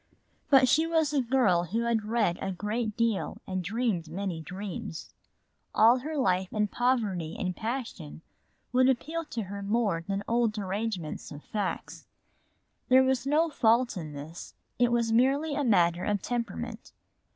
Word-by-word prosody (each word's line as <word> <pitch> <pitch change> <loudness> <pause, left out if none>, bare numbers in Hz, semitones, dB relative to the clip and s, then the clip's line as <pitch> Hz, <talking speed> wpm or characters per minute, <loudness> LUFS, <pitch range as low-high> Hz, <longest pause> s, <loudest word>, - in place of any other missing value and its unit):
But 265 -2 +6
she 315 +6 +3
was 320 -3 +1
a 280 - +3
girl 230 -9 +2
who 220 +7 -1
had 235 -2 0
read 215 -6 +1
a 195 - -2
great 215 +3 -3
deal 230 -4 0
and 185 -1 -3
dreamed 200 -4 -1
many 180 -1 -3
dreams. 180 -1 -7 0.6
All 230 +4 +6
her 305 +4 -5
life 185 -7 +1
poetry 210 -6 0
and 185 -2 -2
passion 220 - -5 0.5
would 255 +1 +4
appeal 315 +6 -1
to 230 -6 -4
her 200 +1 -6
more 200 -5 0
than 200 0 -2
cold 230 -2 +1
arrangements 195 -4 -3
of 145 0 -9
facts. 205 -3 -4 0.8
There 260 +1 +7
was 260 0 0
no 315 +3 +2
fault 235 -2 +3
in 155 -5 -6
this, 150 +4 -9 0.2
it 245 -1 +4
was 235 -1 +1
merely 275 +6 +2
a 290 - 0
matter 175 -7 +3
of 205 -1 0
temperament. 240 -1 -4
220 Hz, 150 wpm, -28 LUFS, 185-250 Hz, 0.8 s, There